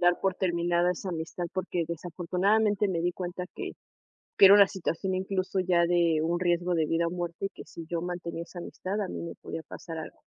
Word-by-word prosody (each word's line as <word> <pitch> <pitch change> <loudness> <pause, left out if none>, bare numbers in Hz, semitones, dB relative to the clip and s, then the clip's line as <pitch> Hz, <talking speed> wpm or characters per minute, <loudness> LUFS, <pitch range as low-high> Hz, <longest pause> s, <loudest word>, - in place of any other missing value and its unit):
dar 175 0 +4
por 195 -1 +1
terminada 175 -1 +1
esa 180 +1 -4
amistad, 170 +1 -4
porque 180 -2 -1
desafortunadamente 185 +5 +1
me 175 -3 0
di 175 +1 +1
cuenta 180 0 -4
que - - -5 0.7
que - - +9
era 195 - +10
una 200 -1 +8
situación, 190 0 -2
incluso, 185 0 -1
ya 175 -2 +3
de 170 -2 +3
un 170 +2 0
riesgo 175 0 +1
de 160 -2 +2
vida 165 +2 +1
o - - 0
muerte 175 +1 -3
y - - -18
que - - -12
si 165 - -9
yo 170 0 -1
mantenía 175 -1 -4
esa 175 +1 -10
amistad 185 +2 -5
a 200 - -1
mí - - -5
me 170 - -6
podía 160 - -7
pasar 165 -2 -7
algo, 160 - -7
175 Hz, 215 wpm, -28 LUFS, 170-185 Hz, 0.7 s, era